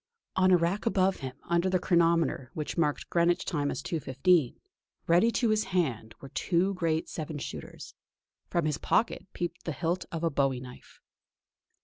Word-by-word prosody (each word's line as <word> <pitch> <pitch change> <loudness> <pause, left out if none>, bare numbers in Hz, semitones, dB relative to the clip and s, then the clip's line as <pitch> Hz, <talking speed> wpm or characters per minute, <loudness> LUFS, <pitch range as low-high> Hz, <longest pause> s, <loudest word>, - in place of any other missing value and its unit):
On 185 0 +4
a 180 - +7
rack 175 +7 -1
above 190 -3 +2
him, 130 -2 -6
under 170 +2 +1
the 185 - +3
chronometer 170 -7 +2
which 155 -2 -4
marked 150 -4 0
Greenwich 170 0 +2
time 145 -5 -1
as 135 - -4
2.15, 155 -1 +1 0.5
ready 175 +7 +4
to 235 - +2
his 215 0 +2
hand, 130 - -1
were 135 - -10
two 185 +7 +1
great 165 -3 -1
seven 155 -1 -5
shooters; - - -8 0.5
from 170 -2 0
his 150 -1 -1
pocket 225 - 0
peeped 175 - -4
the 165 - -3
hilt 175 +5 -1
of 165 0 -4
a 165 - +2
bowie 135 -2 +1
knife. 125 0 -13
170 Hz, 165 wpm, -29 LUFS, 145-180 Hz, 0.5 s, a